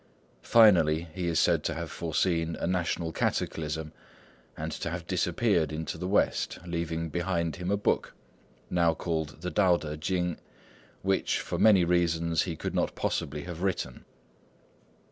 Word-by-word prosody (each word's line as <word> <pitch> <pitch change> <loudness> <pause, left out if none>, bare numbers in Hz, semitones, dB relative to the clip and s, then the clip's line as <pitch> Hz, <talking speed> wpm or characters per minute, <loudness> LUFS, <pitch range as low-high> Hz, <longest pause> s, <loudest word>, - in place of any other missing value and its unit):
Finally, 85 -8 +5
he 90 -2 -3
is 80 -2 +1
said - - +3
to - - -1
have - - -5
foreseen 85 -2 0
a - - -3
national 85 -2 -1
cataclysm, 80 0 -2 0.6
and 80 +1 -4
to 85 - -4
have 85 0 -5
disappeared 90 -2 +1
into 80 +1 -4
the 90 +3 -4
West, 100 - +1
leaving 85 -1 -2
behind 85 -1 -1
him 90 +1 -4
a 100 - +2
book, 100 - 0 0.5
now 85 -2 +2
called 80 -4 -3
the 90 - -2
Tao 95 -4 +4
Tê 75 -1 -6
Ching, 90 0 -1 0.7
which, 95 0 +1
for - - -4
many 105 -5 +6
reasons, 85 -2 +2
he 85 -3 -2
could - - -4
not - - 0
possibly 75 +1 -2
have 85 -1 -7
written. 90 -10 -2
85 Hz, 150 wpm, -28 LUFS, 80-90 Hz, 0.7 s, many